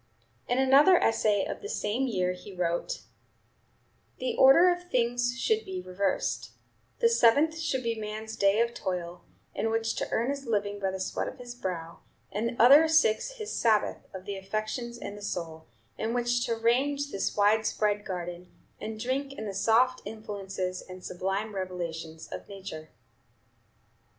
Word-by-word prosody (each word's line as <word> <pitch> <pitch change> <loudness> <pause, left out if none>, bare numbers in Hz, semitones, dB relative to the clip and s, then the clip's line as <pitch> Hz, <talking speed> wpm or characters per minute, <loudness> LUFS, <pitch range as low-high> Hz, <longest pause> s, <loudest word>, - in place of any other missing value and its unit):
In 245 - +1
another 275 +7 +6
essay 215 - +2
of - - -5
the 415 - -6
same 235 - -1
year 185 -6 0
he 185 +2 -10
wrote: 175 - -1 1.2
"The 255 - -2
order 275 +7 +7
of 355 0 -4
things 245 0 +1
should 440 - +1
be 375 -1 -5
reversed: 195 - -2 0.4
the 465 - +4
seventh 315 - +4
should 275 -6 -1
be 230 0 0
man's 220 0 -6
day 200 +3 +3
of 235 0 0
toil, 180 -4 -4 0.3
in 225 - -1
which 225 0 0
to - - -2
earn 235 +4 0
his 280 -2 -6
living 205 -2 -1
by 195 -1 0
the 190 0 -4
sweat 185 - -2
of - - -7
his 245 -1 -8
brow, 175 -8 -5 0.3
and 225 +3 -1
the 235 - -9
other 280 +7 +8
six 315 - +3
his 440 -3 -6
Sabbath 220 -3 +1
of 190 -1 -9
the 200 - -4
affections 215 +5 -4
and 205 -3 -7
the 205 - -10
soul, 165 -5 -5 0.3
in 225 +2 -1
which 245 +1 +1
to 230 - 0
range 275 +5 +1
this 195 - -2
wide 215 +2 +4
spread 210 -1 0
garden, 175 -2 -6 0.3
and 220 0 -6
drink 270 +4 -2
in 220 - -6
the 200 - -4
soft 235 +6 +3
influences 195 -4 -5
and 185 0 -11
sublime 195 +4 -2
revelations 170 -4 -5
of - - -7
Nature." 185 -6 -8
220 Hz, 165 wpm, -28 LUFS, 190-255 Hz, 1.2 s, other